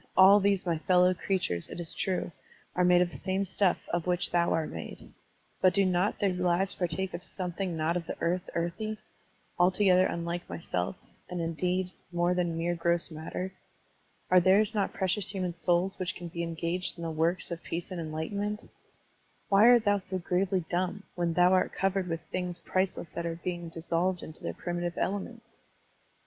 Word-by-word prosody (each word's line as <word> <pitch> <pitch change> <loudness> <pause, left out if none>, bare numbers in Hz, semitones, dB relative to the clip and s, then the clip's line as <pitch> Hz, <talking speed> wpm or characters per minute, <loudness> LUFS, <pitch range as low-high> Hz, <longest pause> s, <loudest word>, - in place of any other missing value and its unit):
All 195 +2 +9
these 200 -1 +2
my 170 -3 0
fellow 180 +2 +4
crea 190 +2 0
tures, 90 - -3
it - - -7
is 170 -2 -3
true, 185 -2 -1 0.4
are 180 - +3
made 180 0 +6
of 175 - -4
the - - -8
same 190 +1 -1
stuff 190 0 +2
of 175 0 -1
which 180 0 +1
thou 170 -1 +2
art 160 -1 0
made. 80 - -8 0.5
But 185 - +5
do 200 -1 +4
not 185 +2 +1
their 195 -2 +1
lives 180 +2 +1
partake 185 +2 -2
of 170 +1 -5
something 180 -2 -4
not 160 +2 0
of 170 -2 -3
the - - -5
earth 180 +3 -1
earthy, 175 +6 -2 0.6
altogether 185 +1 +5
tmUke 170 +1 -3
thyself, 90 - -3 0.3
and, 180 -1 -4
indeed, 180 +3 -1 0.2
more 175 +1 +2
than 175 -2 0
mere 170 +1 0
gross 170 0 0
matter? 160 +4 -5 0.8
Are 185 - +8
theirs 200 +4 +4
not 205 -3 0
precious 190 +2 0
human 185 -3 -2
souls 175 +2 +1
which 185 0 -2
can 175 -1 -7
be 170 +1 -4
engaged 170 +2 -2
in 170 - -7
the 165 - -2
works 165 +3 0
of 170 0 -4
peace 175 +3 -5
and 180 -2 -3
enlightenment? 200 +7 -4 0.8
Why 200 +3 +6
art 240 -2 +6
thou 205 0 +3
so 185 0 -4
gravely 185 0 0
dumb, 185 +3 -1
when 175 -1 0
thou 180 +1 +5
art 185 - +2
covered 195 -1 0
with 165 -1 -3
things 180 -1 -2
priceless 185 -1 -1
that 170 +2 -4
are 165 0 -4
being 175 -2 -3
dissolved 170 +2 -1
into 155 - -10
their - - -4
primitive 175 0 -3
elements? 230 +4 -4
180 Hz, 185 wpm, -29 LUFS, 170-190 Hz, 0.8 s, All